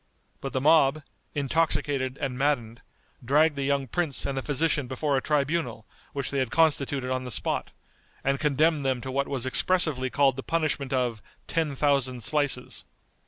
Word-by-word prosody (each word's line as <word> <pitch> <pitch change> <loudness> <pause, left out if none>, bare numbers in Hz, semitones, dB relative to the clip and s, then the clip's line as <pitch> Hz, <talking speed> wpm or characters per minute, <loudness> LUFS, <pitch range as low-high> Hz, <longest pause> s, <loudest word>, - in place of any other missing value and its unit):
But 135 - -5
the 130 - +1
mob, 150 0 +4 0.3
intoxicated 140 -2 0
and 135 -3 -2
maddened, 125 -4 -1 0.4
dragged 150 +5 +3
the 140 - -3
young 140 -1 +1
prince 160 +1 -1
and 140 - -2
the 135 - -1
physician 145 -1 +1
before 140 +3 -1
a 135 - +1
tribunal 145 -6 -1 0.3
which 140 -1 -3
they 140 - 0
had 130 -3 0
constituted 140 -4 +1
on 130 0 -1
the 125 - -6
spot, - - -1 0.5
and 135 0 +1
condemned 150 +1 +2
them 130 -2 0
to 130 - -5
what 140 +1 0
was 130 -3 -2
expressively 140 -2 +2
called 135 -1 +2
the - - -3
punishment 155 -3 -1
of 125 -4 0 0.2
"ten 160 -4 -1
thousand 130 -4 +1
slices." 145 -2 -1
140 Hz, 165 wpm, -27 LUFS, 130-150 Hz, 0.5 s, mob